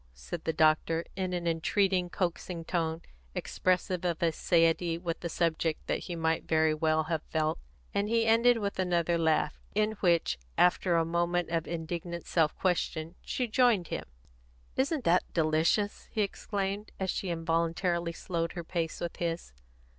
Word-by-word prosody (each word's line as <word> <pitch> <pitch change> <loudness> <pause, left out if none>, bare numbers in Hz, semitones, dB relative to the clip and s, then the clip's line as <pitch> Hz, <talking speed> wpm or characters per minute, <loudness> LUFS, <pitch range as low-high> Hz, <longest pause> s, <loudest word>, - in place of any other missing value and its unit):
said 65 - -7
the 160 - +2
doctor, 160 +1 +2
in 185 -1 -2
an 175 -1 -2
entreating, 180 +2 +1
coaxing 175 -2 -3
tone, 165 -1 -1 0.3
expressive 185 0 0
of 175 -1 -1
a 165 - +4
satiety 165 +1 +2
with 170 -1 -3
the 170 - -4
subject 165 -1 0
that - - -1
he 175 - -4
might 160 -1 0
very 160 -1 +3
well 155 0 +2
have 155 0 -2
felt; 155 - 0 0.3
and 200 +1 0
he 230 0 +3
ended 230 +2 +5
with 200 -3 -3
another 175 -2 +2
laugh, 160 -2 +1
in 215 +1 +2
which, 170 - +2 0.2
after 180 0 +4
a 165 -1 +3
moment 175 +1 0
of 165 -1 0
indignant 170 +1 -4
self 160 -3 +2
question, 170 -3 -1
she 255 - -2
joined 225 -6 +3
him. - - -3 0.7
"Isn't 280 +1 0
that 180 -2 +2
delicious?" 165 +6 +1
he 215 - +1
exclaimed; 200 0 -3
and 190 - -1
she 185 +1 -2
involuntarily 170 +1 0
slowed 165 0 -3
her 175 - -5
pace 165 -1 -3
with 170 - -4
his. 170 - -3
170 Hz, 160 wpm, -30 LUFS, 165-185 Hz, 0.7 s, ended